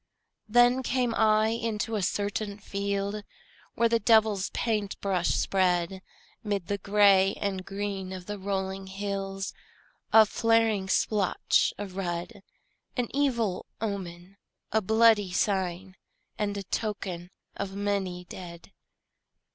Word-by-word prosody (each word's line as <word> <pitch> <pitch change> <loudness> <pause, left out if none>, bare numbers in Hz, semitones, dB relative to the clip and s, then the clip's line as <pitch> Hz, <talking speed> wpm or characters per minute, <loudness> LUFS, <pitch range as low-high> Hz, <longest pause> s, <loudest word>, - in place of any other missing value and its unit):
Then 245 +3 +5
came 250 -2 0
I 215 0 +3
into 225 0 -2
a 210 - 0
certain 205 +2 -2
field 200 0 -3 0.5
Where 235 - +3
the 230 0 +2
devil's 215 -3 +3
paint 210 -4 -2
brush 185 -3 0
spread 185 -1 +1 0.4
'Mid 200 -4 -2
the 200 +2 -2
gray 195 -1 +4
and 195 -2 -3
green 195 -1 -4
of 185 -1 -7
the 205 +1 -5
rolling 190 0 -3
hills 195 0 -4 0.6
A 220 -1 +8
flaring 225 -3 +2
splotch 200 0 +2
of 195 -2 -7
red, 180 +3 -4 0.6
An 245 +1 -2
evil 235 -9 0
omen, 190 -3 -5 0.3
a 220 - +2
bloody 220 -1 +4
sign, 185 -1 -1 0.4
And 205 -1 -2
a 200 - -4
token 190 -3 -4 0.3
of 195 -1 -5
many 195 -3 -2
dead. 175 -1 -10
200 Hz, 120 wpm, -28 LUFS, 190-215 Hz, 0.6 s, A